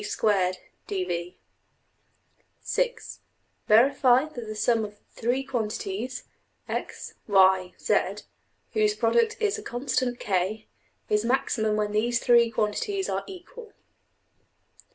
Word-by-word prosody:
\Item{(6)} 185 - -6 0.5
Verify 255 +3 +5
that 245 -7 -8
the 215 - -5
sum 225 +1 +2
of 210 0 -7
three 245 +4 -1
quantities 230 -1 -3 0.4
$x$,~$y$,~$z$, 190 -2 +1 0.5
whose 425 -1 +2
product 460 0 +2
is 430 -1 0
a - - -8
constant~$k$, 240 - -1 0.4
is 210 0 +1
maximum 230 -3 +1
when 210 -1 -1
these 235 +3 +1
three 235 -1 +4
quantities 380 - -1
are - - -1
equal. 395 +4 -11
235 Hz, 90 wpm, -26 LUFS, 210-280 Hz, 0.5 s, Verify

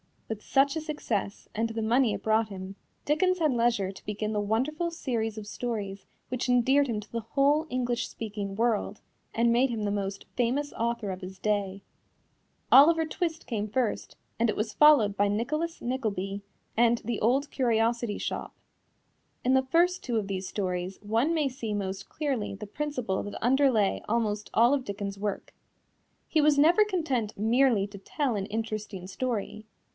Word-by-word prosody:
With 220 -2 -5
such 275 +5 +2
a 320 - -2
success, 245 -10 -3
and 225 +2 -1
the 225 0 -3
money 230 +1 +3
it - - -5
brought 220 0 +2
him, 190 -1 -8 0.3
Dickens 365 +5 +2
had 310 -3 +3
leisure 230 -5 +1
to 195 - -15
begin 210 +1 -3
the 210 - 0
wonderful 260 +11 0
series 235 -9 -3
of 215 - -6
stories 205 -3 -4 0.2
which 255 +1 -2
endeared 260 +3 +4
him 220 -4 -2
to 210 - -16
the 235 - -2
whole 280 +7 +2
English 245 -1 -1
speaking 205 -3 -5
world, 220 -2 0 0.3
and 235 +1 +3
made 250 +3 +3
him 225 -3 -3
the 205 - 0
most 195 -1 -3
famous 260 +4 0
author 230 -3 -2
of 185 +1 -6
his 185 +1 -8
day. 200 -1 -1 0.9
Oliver 320 +4 +7
Twist 325 0 -3
came 215 -4 -2
first, 230 +1 -2 0.2
and 230 0 +3
it - - 0
was 215 0 -2
followed 260 -10 +5
by 205 - +3
Nicholas 305 +11 -2
Nickleby 205 -6 -2 0.4
and 235 0 +4
The 230 0 -3
Old 270 +6 +1
Curiosity 235 -3 +1
Shop. - - -4 0.9
In 255 - +3
the 265 0 +3
first 350 +4 +3
two 240 - -3
of 210 -3 -1
these 190 -1 -3
stories 185 -1 -3
one 225 +9 +1
may 305 -4 +1
see 235 -4 -4
most 195 -1 -4
clearly 270 -10 -2
the 210 - -7
principle 250 -4 -2
that 205 - -6
underlay 250 -5 +3
almost 210 -2 -1
all 235 +4 +5
of 270 -3 0
Dickens's 200 -1 -5
work. 205 -2 -3 0.7
He 315 - +2
was 295 -1 +4
never 340 +9 +6
content 280 - -1
merely 225 0 +3
to 200 -1 -10
tell 260 +4 -1
an 195 -1 -2
interesting 215 -3 -4
story. 215 +1 -4
230 Hz, 170 wpm, -28 LUFS, 205-270 Hz, 0.9 s, Oliver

